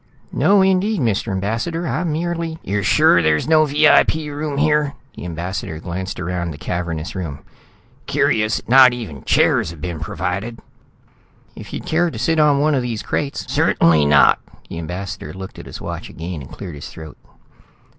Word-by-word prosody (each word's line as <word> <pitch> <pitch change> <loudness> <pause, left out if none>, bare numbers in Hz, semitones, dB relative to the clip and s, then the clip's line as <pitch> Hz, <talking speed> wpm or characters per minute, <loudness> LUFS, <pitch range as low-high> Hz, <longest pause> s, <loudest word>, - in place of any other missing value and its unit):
"No 195 +7 +4
indeed, 190 +2 +2
Mr. 115 -4 0
Ambassador. 115 - -2
I - - -1
merely 165 0 -2
" - - -33
"You're 105 +1 -1
sure 110 - +4
there's 80 - +1
no 155 -1 +5
VIP 150 +2 +4
room 150 -1 -4
here?" 150 -1 +2 0.2
The - - -8
ambassador 85 -1 -4
glanced 90 +3 -5
around 85 -1 -3
the 75 - -7
cavernous 85 0 -4
room. 85 -7 -6 0.6
"Curious 110 0 +1
that - - -9
not 130 0 +7
even 100 - -7
chairs - - +3
have 85 -1 -10
been 85 0 -5
provided." 95 +8 -4 1.0
"If - - -10
you'd - - -6
care 175 +2 +1
to 125 - -8
sit 160 +8 +1
on 150 -2 +4
one 155 +1 +2
of 135 - +1
these 120 -3 -4
crates 140 -1 -3
" - - -14
"Certainly 80 -3 +3
not." 75 -2 +5 0.3
The 85 - -6
ambassador 90 -2 -6
looked 95 0 -9
at - - -10
his - - -8
watch - - -6
again 85 -2 -6
and 65 - -11
cleared 90 -5 -8
his 70 - -8
throat. 80 -1 -11
105 Hz, 175 wpm, -20 LUFS, -, 1.0 s, not